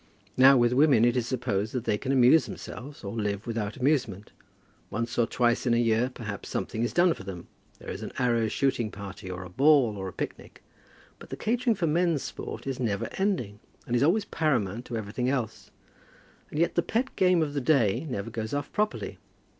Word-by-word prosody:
Now, 135 +1 +7
with 120 0 +3
women, 135 -4 +5
it 120 0 +2
is 120 -2 0
supposed 115 -5 -1
that 125 -3 -2
they 105 -3 0
can 135 - -2
amuse 135 +4 +5
themselves 140 +3 -9
or 100 - -5
live 105 -2 -2
without 110 -3 -3
amusement. 125 -8 0 0.6
Once 115 +1 -3
or 120 -2 +2
twice 120 +1 +1
in 120 - +4
a - - +2
year, 115 +1 +2
perhaps 105 -5 -7
something 110 - -3
is 120 - 0
done 175 -1 +4
for - - -11
them. 90 -3 -7 0.3
There - - -8
is - - -6
an - - -6
arrow 120 -3 +2
shooting 120 -1 0
party, 100 -2 -8
or 90 0 -5
a 90 - -9
ball, 135 - +4
or 95 -1 -4
a 95 - -7
picnic. - - -7 0.6
But - - -13
the - - -6
catering 240 +1 +1
for 185 - -1
men's 165 -1 +1
sport - - -7
is 135 -1 -3
never 105 -5 -1
ending, 125 - -1 0.3
and 120 - -1
is 120 - +2
always 190 +9 +3
paramount 120 -7 -1
to 120 - -4
everything 110 +4 -2
else. 120 -5 -3 0.8
And - - -6
yet 170 +2 +2
the 170 - +2
pet 240 +9 -2
game 180 -3 +4
of 145 -2 -4
the 140 - -1
day 130 -1 +2
never 100 -6 -4
goes 110 +3 -4
off 145 0 -4
properly. 210 0 -2
120 Hz, 205 wpm, -27 LUFS, 110-145 Hz, 0.8 s, Now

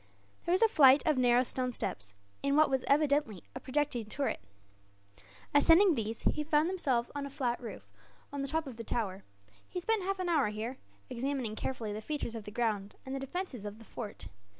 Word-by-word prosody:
There 340 - 0
was 375 +5 +4
a - - +8
flight 275 -8 +7
of 305 -4 +3
narrow 245 0 +5
stone 255 0 -1
steps, 100 - -4 0.3
in 280 0 +1
what 310 -1 +5
was 265 -1 +1
evidently 285 - +2
a - - -5
projecting 265 -4 -1
turret. 275 +6 -2 1.1
Ascending 330 +6 +6
these, 225 -3 -3
he 300 - +1
found 300 +1 +3
himself 265 -10 0
on 285 -1 -3
a - - -8
flat 260 -4 -2
roof, 235 - -8 0.5
on 285 - -2
the 275 - -2
top 315 +3 0
of 260 -5 -8
the 230 - -5
tower. 200 -4 -2 0.5
He 360 - -3
spent 445 +4 +1
half 390 +1 -1
an 370 -1 -2
hour 310 -8 +3
here, 220 +5 -4 0.3
examining 255 -3 -2
carefully 225 -3 -3
the 215 - -5
features 290 -2 -3
of 225 -3 -6
the - - -6
ground 210 -3 -1
and 265 - -5
the 270 - -2
defences 270 - -4
of 205 0 -6
the 225 - -14
fort. 210 - -7
265 Hz, 200 wpm, -32 LUFS, 225-300 Hz, 1.1 s, a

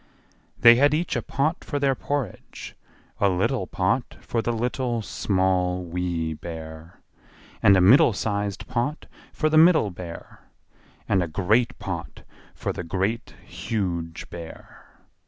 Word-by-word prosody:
They 120 0 +8
had 145 +3 +4
each 165 -1 -1
a 120 - 0
pot 140 +8 -1
for 145 - -3
their 140 -1 +2
porridge, 135 -5 -5 0.4
a 100 - +3
little 90 0 0
pot - - -1
for 115 - -2
the 120 - -1
Little, 120 0 -2
Small, 95 -3 0
Wee 85 -2 -2
Bear; 80 +1 -9 0.6
and 100 -1 +6
a - - +4
middle 115 +7 +7
sized 100 -1 -3
pot 125 +6 -2 0.3
for 155 - 0
the 155 0 +4
Middle 160 - +5
Bear; 85 -1 -9 0.7
and 95 -3 +2
a 85 - -1
great 105 +8 +1
pot - - -6 0.3
for - - -3
the - - -5
Great, 95 +7 -2
Huge 85 -7 -4
Bear. 85 -1 -11
100 Hz, 135 wpm, -24 LUFS, 90-125 Hz, 0.7 s, They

